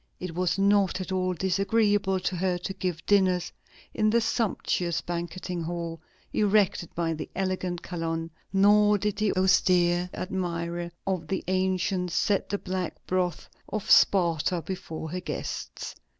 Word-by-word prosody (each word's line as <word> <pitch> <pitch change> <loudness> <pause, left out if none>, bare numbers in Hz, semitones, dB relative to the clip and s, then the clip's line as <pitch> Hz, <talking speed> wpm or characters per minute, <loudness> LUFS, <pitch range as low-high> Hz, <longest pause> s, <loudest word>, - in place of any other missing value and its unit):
It 180 -2 -5
was 180 +1 0
not 200 -1 +3
at 185 - -5
all 185 -1 0
disagreeable 195 +1 +2
to 185 0 -1
her 180 0 +1
to 180 +2 -5
give 180 -3 -3
dinners 185 -3 +3 0.4
in 215 - +2
the 235 +2 +4
sumptuous 195 -7 0
banqueting 175 +1 -4
hall 165 -1 -4 0.3
erected 205 -4 +2
by 165 -1 0
the 155 - -6
elegant 185 -2 -2
Calonne, 165 -1 -3 0.2
nor 205 +1 +5
did 210 +1 -2
the 215 -1 +2
austere 180 -1 +3
admirer 170 -2 -3 0.2
of 190 -3 -2
the 190 - -2
ancients 185 -1 0
set 200 -2 +1
the 205 - 0
black 185 -3 -4
broth 180 -1 -1 0.2
of 215 -2 -2
Sparta 170 -2 +4
before 165 -3 -6
her 180 +1 -3
guests. 155 -4 -5
185 Hz, 140 wpm, -27 LUFS, 175-195 Hz, 0.4 s, nor